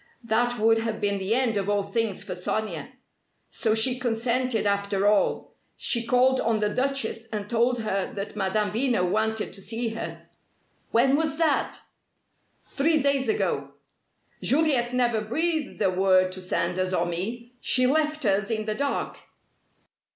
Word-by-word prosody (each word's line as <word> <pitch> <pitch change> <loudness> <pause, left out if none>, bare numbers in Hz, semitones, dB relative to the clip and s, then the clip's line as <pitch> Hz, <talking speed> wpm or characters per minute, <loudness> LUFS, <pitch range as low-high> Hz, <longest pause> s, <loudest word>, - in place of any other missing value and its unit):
That 240 +2 +1
would 225 +1 +3
have 225 -1 -3
been 200 -1 0
the 195 +4 0
end 245 -4 +1
of 200 0 -1
all 205 -1 +1
things 205 0 -2
for - - -5
Sonia! 190 +1 -3 0.6
So 220 -2 0
she 250 +3 +2
consented, 240 -1 0
after 200 0 +1
all. 205 -1 +1 0.2
She 235 -1 0
called 255 +1 +3
on 225 -1 +1
the 210 0 0
Duchess 250 -4 -1
and 210 -2 -5
told 235 +2 +1
her 195 -3 -2
that 200 +1 -5
Madame 205 0 0
Veno 225 -5 +1
wanted 220 +3 -1
to 195 - -6
see 230 +3 -2
her." 225 +1 -7 0.6
"When 265 +4 +3
was 310 0 0
that?" 315 -4 +1 0.9
"Three 315 +3 +1
days 280 -2 +1
ago." - - -1 0.7
"Juliet 275 -4 +2
never 240 -3 +2
breathed 315 +8 -1
a 190 - +3
word 185 0 +3
to 185 - -7
Sanders 185 +1 -1
or 170 - +1
me. 225 +8 -4
She 255 0 +2
left 305 +1 +1
us 195 0 +1
in 215 -2 -2
the 215 - -1
dark." 280 +5 -2
225 Hz, 155 wpm, -26 LUFS, 200-255 Hz, 0.9 s, would